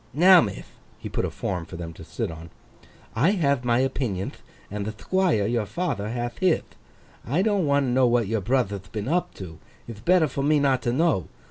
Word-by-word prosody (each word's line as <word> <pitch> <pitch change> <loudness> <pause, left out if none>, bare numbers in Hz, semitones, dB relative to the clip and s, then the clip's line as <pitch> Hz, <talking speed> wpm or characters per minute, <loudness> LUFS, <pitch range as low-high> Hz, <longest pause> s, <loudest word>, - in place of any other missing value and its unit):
Now, 180 +3 +8
mith;' 100 -3 -6 0.2
he - - -7
put - - -1
a - - -2
form 90 -3 -3
for 90 - -9
them 85 -1 -6
to - - -12
sit - - -4
on; 80 +1 -10 0.7
'I 130 +10 +3
have 140 -9 +1
my 120 0 +2
opinionth, 110 -8 -4 0.3
and 105 0 -3
the 110 - -3
Thquire 165 - +1
your 115 -2 -1
father 140 - -2
hath 120 +1 -4
hith. 185 -3 +1 0.5
I 155 +10 0
don't 200 -6 +1
want 140 0 +3
to 125 - -1
know 130 0 +4
what 120 -1 +2
your 110 +1 -1
brother'th 100 -4 -1
been 105 0 -4
up 175 +5 -1
to; 85 -4 -9 0.3
ith 110 -2 -9
better 175 -1 +4
for 140 - -4
me 150 +2 +3
not 135 -2 +2
to 120 - 0
know. 145 - +1
120 Hz, 210 wpm, -25 LUFS, 105-155 Hz, 0.7 s, Now